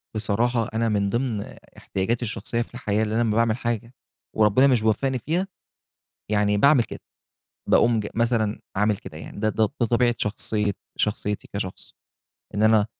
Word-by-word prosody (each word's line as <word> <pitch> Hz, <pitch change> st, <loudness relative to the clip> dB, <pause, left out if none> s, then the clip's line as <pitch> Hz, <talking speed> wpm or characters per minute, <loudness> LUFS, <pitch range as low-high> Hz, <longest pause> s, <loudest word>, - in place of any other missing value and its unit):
بصراحة، 115 Hz, +2 st, 0 dB
أنا 115 Hz, +1 st, +1 dB
من 100 Hz, -2 st, +1 dB
ضِمن 120 Hz, -1 st, -1 dB, 0.4 s
احتياجاتي 105 Hz, +6 st, -2 dB
الشخصية 115 Hz, +1 st, -3 dB
في 120 Hz, -, -7 dB
الحياة، 110 Hz, -3 st, 0 dB
إن 105 Hz, -, -2 dB
أنا 115 Hz, +2 st, +1 dB
لمّا 110 Hz, -2 st, +1 dB
باعمل 115 Hz, 0 st, +2 dB
حاجة 120 Hz, 0 st, -3 dB, 0.4 s
وربنا 110 Hz, +5 st, +5 dB
مش 125 Hz, -5 st, +3 dB
بيوفقني 130 Hz, +4 st, +1 dB
فيها، 170 Hz, -, -1 dB, 0.8 s
يعني 105 Hz, -1 st, +2 dB
باعمل 140 Hz, +2 st, +5 dB
كده، -, -, -9 dB, 0.7 s
باقوم 115 Hz, -2 st, +4 dB
ج 105 Hz, -, -3 dB
مثلًا 115 Hz, -2 st, +1 dB, 0.2 s
عامل 105 Hz, +1 st, +2 dB
كده 80 Hz, -, -10 dB
يعني. 80 Hz, -, -9 dB
ده، 110 Hz, +1 st, +2 dB
ده 110 Hz, 0 st, +2 dB
طبيعة 120 Hz, 0 st, +1 dB
شخصي 105 Hz, 0 st, -1 dB, 0.2 s
شخصيتي 105 Hz, -1 st, -1 dB
كشخص، 95 Hz, -2 st, -5 dB, 0.6 s
إن 105 Hz, -, 0 dB
أنا 110 Hz, -1 st, +5 dB
110 Hz, 155 wpm, -24 LUFS, 105-120 Hz, 0.8 s, وربنا